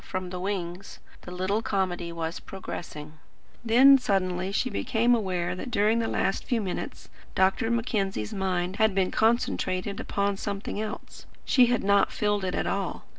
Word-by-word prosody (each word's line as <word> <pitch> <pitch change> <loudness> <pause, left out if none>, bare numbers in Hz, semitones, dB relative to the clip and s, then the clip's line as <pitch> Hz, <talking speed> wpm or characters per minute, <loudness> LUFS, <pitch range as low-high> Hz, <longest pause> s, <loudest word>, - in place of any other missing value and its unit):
from 185 -1 -5
the 180 - -4
wings. 185 -1 -4 0.2
The - - -10
little 185 +4 -1
comedy 185 -5 -1
was 165 0 -4
progressing. 155 -5 -8 0.4
Then 260 +4 +7
suddenly 185 -4 0
she 255 +5 0
became 235 +2 +2
aware 180 -6 0
that 215 +8 -6
during 220 0 +2
the 225 - 0
last 195 - 0
few 240 - 0
minutes 190 -4 -5 0.3
Dr. 190 +4 +2
Mackenzie's 205 - -1
mind 185 -1 -1
had 220 -3 +3
been 190 -1 +1
concentrated 205 -4 0
upon 200 0 -1
something 200 +1 -4
else. 215 -1 -7 0.2
She 250 -3 +5
had 245 -2 +1
not 200 0 +3
filled 205 -1 0
it 185 -1 -2
at - - -1
all. 195 -2 -3
195 Hz, 160 wpm, -27 LUFS, 185-220 Hz, 0.4 s, Then